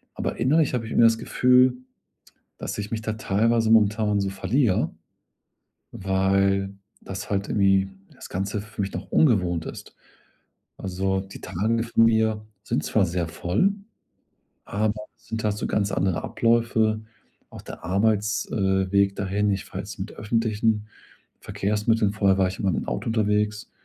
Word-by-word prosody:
aber -, -, -3 dB
innerlich 145 Hz, +6 st, +3 dB
habe 120 Hz, -2 st, -1 dB
ich 110 Hz, -, -8 dB
irgendwie 115 Hz, -, +5 dB
das 115 Hz, 0 st, +4 dB
Gefühl, 125 Hz, +1 st, +4 dB, 0.8 s
dass -, -, -5 dB
ich 105 Hz, 0 st, -4 dB
mich 110 Hz, -1 st, -2 dB
da 110 Hz, 0 st, -2 dB
teilweise 110 Hz, +2 st, +1 dB
momentan 105 Hz, -1 st, +3 dB
so 100 Hz, -1 st, -1 dB
verliere, 95 Hz, -, +1 dB, 1.0 s
weil 95 Hz, +1 st, +1 dB, 0.3 s
das 95 Hz, 0 st, -7 dB
halt 100 Hz, -1 st, -1 dB
irgendwie 95 Hz, -1 st, +3 dB, 0.2 s
das -, -, -12 dB
Ganze 100 Hz, +2 st, -3 dB
für 105 Hz, 0 st, -7 dB
mich 100 Hz, 0 st, -3 dB
noch -, -, -7 dB
ungewohnt 90 Hz, -, +2 dB
ist. -, -, -9 dB, 0.8 s
Also, 95 Hz, +1 st, -1 dB
die 95 Hz, 0 st, -11 dB
Tage 115 Hz, +6 st, -1 dB
von 115 Hz, -1 st, +3 dB
mir 110 Hz, -1 st, +2 dB, 0.2 s
sind -, -, -1 dB
zwar 105 Hz, -3 st, +2 dB
sehr 85 Hz, -1 st, -2 dB
voll, 90 Hz, -, +1 dB, 0.9 s
aber 105 Hz, +1 st, -1 dB, 0.2 s
es -, -, -26 dB
sind 110 Hz, -1 st, -4 dB
halt 105 Hz, -1 st, 0 dB
so -, -, -3 dB
ganz 100 Hz, -1 st, 0 dB
andere 95 Hz, -2 st, 0 dB
Abläufe, 115 Hz, -2 st, +1 dB, 0.5 s
auch -, -, -10 dB
der -, -, -10 dB
Arbeits 105 Hz, +1 st, +1 dB
äh, 95 Hz, -2 st, +1 dB
Weg 100 Hz, 0 st, +3 dB
dahin, 100 Hz, +1 st, 0 dB
ich 95 Hz, -, -3 dB
fahre -, -, -7 dB
jetzt 100 Hz, 0 st, -8 dB
mit 100 Hz, +3 st, -5 dB
öffentlichen 110 Hz, -1 st, 0 dB, 0.5 s
Verkehrsmitteln. 105 Hz, +1 st, 0 dB
Vorher 100 Hz, -2 st, +2 dB
war 95 Hz, -1 st, +3 dB
ich 95 Hz, -, -7 dB
immer 95 Hz, -2 st, +1 dB
mit -, -, -2 dB
'm -, -, -15 dB
Auto -, -, -3 dB
unterwegs, 105 Hz, -1 st, 0 dB
105 Hz, 160 wpm, -24 LUFS, 95-110 Hz, 1.0 s, irgendwie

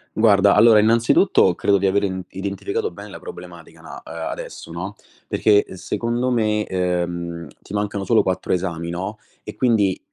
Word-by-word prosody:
Guarda, 100 Hz, -3 st, +5 dB
allora 110 Hz, 0 st, +7 dB
innanzitutto 115 Hz, -, +4 dB
credo 100 Hz, +3 st, +2 dB
di 100 Hz, -, -1 dB
aver 100 Hz, +1 st, +2 dB
in 95 Hz, -2 st, -2 dB
identificato 100 Hz, -, -3 dB
bene -, -, -10 dB
la -, -, -10 dB
problematica 455 Hz, -, -11 dB
na -, -, -10 dB
adesso, -, -, -7 dB
no, -, -, -6 dB, 0.3 s
perché, 410 Hz, 0 st, +3 dB
ehm, 400 Hz, -, -11 dB
secondo 120 Hz, +2 st, -2 dB
me, 105 Hz, -3 st, +1 dB
ehm, 85 Hz, -2 st, -2 dB
ti -, -, -12 dB
mancano 105 Hz, -1 st, -2 dB
solo 115 Hz, +3 st, +3 dB
4 95 Hz, 0 st, -2 dB
esami, 85 Hz, -2 st, -3 dB
no, 95 Hz, +5 st, -5 dB, 0.2 s
e 105 Hz, -, -8 dB
quindi 105 Hz, -5 st, +2 dB
100 Hz, 160 wpm, -21 LUFS, 95-115 Hz, 0.3 s, allora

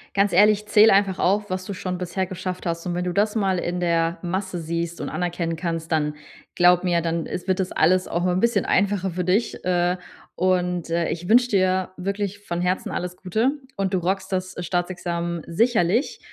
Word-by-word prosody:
Ganz 200 Hz, 0 st, +3 dB
ehrlich, 210 Hz, +2 st, +4 dB
zähle 210 Hz, 0 st, +6 dB
einfach 195 Hz, -1 st, +2 dB
auf, 205 Hz, +2 st, +1 dB
was 185 Hz, 0 st, -3 dB
du 200 Hz, -, -5 dB
schon 185 Hz, -1 st, -4 dB
bisher 185 Hz, +1 st, -2 dB
geschafft 185 Hz, -1 st, -5 dB
hast. 170 Hz, +1 st, -3 dB
Und 175 Hz, -, -2 dB
wenn 175 Hz, +1 st, -1 dB
du 180 Hz, 0 st, -2 dB
das 210 Hz, +3 st, +1 dB
mal 195 Hz, -3 st, +1 dB
in 175 Hz, +1 st, -2 dB
der 170 Hz, -1 st, +1 dB
Masse 185 Hz, 0 st, -3 dB
siehst 170 Hz, +1 st, -3 dB
und -, -, -3 dB
anerkennen 175 Hz, -1 st, -2 dB
kannst, 165 Hz, -1 st, -4 dB
dann 150 Hz, -1 st, +1 dB, 0.4 s
glaube 180 Hz, 0 st, +4 dB
mir, 175 Hz, -1 st, +2 dB
dann 165 Hz, 0 st, -2 dB
is 180 Hz, -, -6 dB
wird 185 Hz, +1 st, +1 dB
das 185 Hz, -, -1 dB
alles 180 Hz, +3 st, +3 dB
auch 175 Hz, +1 st, -1 dB
'n 180 Hz, 0 st, +1 dB
bisschen 230 Hz, -2 st, +2 dB
einfacher 195 Hz, -1 st, +1 dB
für 180 Hz, +1 st, -3 dB
dich, 190 Hz, +4 st, 0 dB
äh. 180 Hz, 0 st, +1 dB, 0.4 s
Und, 180 Hz, -2 st, 0 dB
äh, 170 Hz, 0 st, +1 dB
ich 170 Hz, +2 st, -4 dB
wünsche 245 Hz, +2 st, +6 dB
dir 185 Hz, -2 st, +1 dB
wirklich 200 Hz, +1 st, -3 dB
von 175 Hz, 0 st, -2 dB
Herzen 180 Hz, +1 st, -1 dB
alles 180 Hz, 0 st, -4 dB
Gute. 220 Hz, +9 st, 0 dB, 0.2 s
Und 195 Hz, 0 st, -2 dB
du -, -, +2 dB
rockst 190 Hz, +2 st, -2 dB
das 185 Hz, 0 st, -2 dB
Staatsexamen 175 Hz, -1 st, -2 dB
sicherlich 220 Hz, -, +1 dB
180 Hz, 200 wpm, -23 LUFS, 175-195 Hz, 0.4 s, zähle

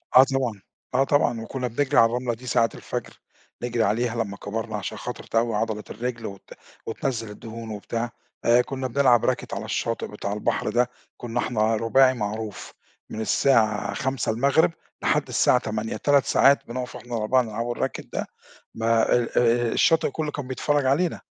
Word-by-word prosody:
آه 130 Hz, -, +11 dB
طبعًا، 130 Hz, -7 st, -1 dB, 0.3 s
آه 135 Hz, +2 st, +4 dB
طبعًا، 120 Hz, -5 st, +2 dB
وكنا 125 Hz, +2 st, -3 dB
بنجرِي 140 Hz, +4 st, 0 dB
على 115 Hz, -, +8 dB
الرملة 120 Hz, +1 st, -1 dB
دي 125 Hz, +3 st, -10 dB
ساعة 115 Hz, -2 st, +3 dB
الفجر، -, -, -6 dB, 0.4 s
نجرِي 120 Hz, -2 st, 0 dB
عليها، 115 Hz, +3 st, 0 dB
لما 100 Hz, -1 st, -8 dB
كَبَرنا 110 Hz, +1 st, -4 dB
عشان 100 Hz, -, -5 dB
خاطر -, -, -6 dB
تقوّي 115 Hz, -1 st, 0 dB
عضلة 110 Hz, -1 st, -1 dB
الرِّجل 120 Hz, +1 st, -4 dB
وت 100 Hz, -2 st, -9 dB, 0.3 s
وتنزّل 115 Hz, -1 st, -3 dB
الدهون 115 Hz, +2 st, -8 dB
وبتاع 115 Hz, +3 st, -3 dB, 0.3 s
آآ، 120 Hz, +1 st, +6 dB
كنا 130 Hz, 0 st, -4 dB
بنلعب 125 Hz, -2 st, +4 dB
racket -, -, -6 dB
على -, -, -4 dB
الشاطئ 115 Hz, 0 st, -2 dB
بتاع 100 Hz, -1 st, -4 dB
البحر 105 Hz, 0 st, -1 dB
ده، 120 Hz, +2 st, +2 dB, 0.3 s
كنا 120 Hz, 0 st, -3 dB
إحنا 110 Hz, -2 st, +1 dB
رُباعي 130 Hz, +4 st, +4 dB
معروف، 105 Hz, -2 st, -5 dB, 0.4 s
من 110 Hz, -, -5 dB
الساعة 110 Hz, -3 st, +2 dB
17:00 135 Hz, +4 st, +1 dB, 0.3 s
لحد -, -, +1 dB
الساعة -, -, +3 dB
20:00 110 Hz, +1 st, -3 dB
3 140 Hz, -1 st, +3 dB
ساعات 140 Hz, +1 st, +4 dB
بنُقف 125 Hz, +1 st, -5 dB
إحنا 120 Hz, -1 st, -6 dB
ال4 115 Hz, +4 st, +2 dB
نلعب 115 Hz, +1 st, -3 dB
الracket -, -, -3 dB
ده، -, -, -2 dB, 0.5 s
ما 115 Hz, 0 st, +2 dB
آآ، 120 Hz, -1 st, +2 dB, 0.4 s
الشاطئ 165 Hz, -2 st, +3 dB
كلّه 155 Hz, 0 st, -3 dB
كان 140 Hz, -3 st, -5 dB
بيتفرّج 145 Hz, +2 st, 0 dB
علينا. 155 Hz, +6 st, +1 dB
120 Hz, 165 wpm, -25 LUFS, 110-130 Hz, 0.5 s, آه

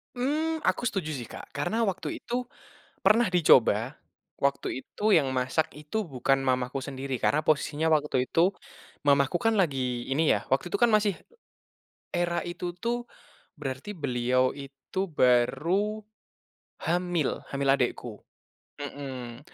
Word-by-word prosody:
Mmm, 310 Hz, +5 st, 0 dB
aku 245 Hz, -, 0 dB
setuju 195 Hz, -8 st, -1 dB
sih, 135 Hz, -6 st, -4 dB
Kak, -, -, -10 dB
karena 215 Hz, +11 st, -1 dB
waktu 185 Hz, -, -5 dB
itu 245 Hz, +1 st, -2 dB, 0.5 s
pernah 210 Hz, 0 st, +4 dB
dicoba, 130 Hz, -, +4 dB, 0.4 s
waktu 140 Hz, -1 st, -1 dB
itu 210 Hz, 0 st, +1 dB
yang 135 Hz, -5 st, +3 dB
masak 130 Hz, +4 st, 0 dB
itu 150 Hz, +10 st, -4 dB
bukan 135 Hz, -3 st, 0 dB
mamaku 130 Hz, +1 st, 0 dB
sendiri 135 Hz, -1 st, -4 dB
karena 145 Hz, +4 st, +2 dB
posisinya 155 Hz, +1 st, +1 dB
waktu 150 Hz, -5 st, +2 dB
itu 175 Hz, +4 st, +3 dB, 0.6 s
mamaku 140 Hz, +3 st, +4 dB
kan 225 Hz, 0 st, +2 dB
lagi 130 Hz, -, 0 dB
ini 155 Hz, +4 st, +2 dB
ya, -, -, -3 dB
waktu 135 Hz, +6 st, +2 dB
itu 175 Hz, -, -3 dB
kan 235 Hz, +3 st, +4 dB
masih 210 Hz, -2 st, +3 dB, 1.0 s
era 175 Hz, 0 st, +1 dB
itu 175 Hz, 0 st, -4 dB
tuh, 240 Hz, +3 st, -1 dB, 0.6 s
berarti 135 Hz, +6 st, -5 dB
beliau 130 Hz, -6 st, +1 dB
itu 140 Hz, +5 st, -8 dB
baru 155 Hz, -, +2 dB, 0.8 s
hamil, 175 Hz, -2 st, 0 dB
hamil 140 Hz, 0 st, 0 dB
adikku, 120 Hz, -4 st, -2 dB, 0.6 s
heeh, 130 Hz, -4 st, -6 dB
145 Hz, 130 wpm, -28 LUFS, 130-185 Hz, 1.0 s, pernah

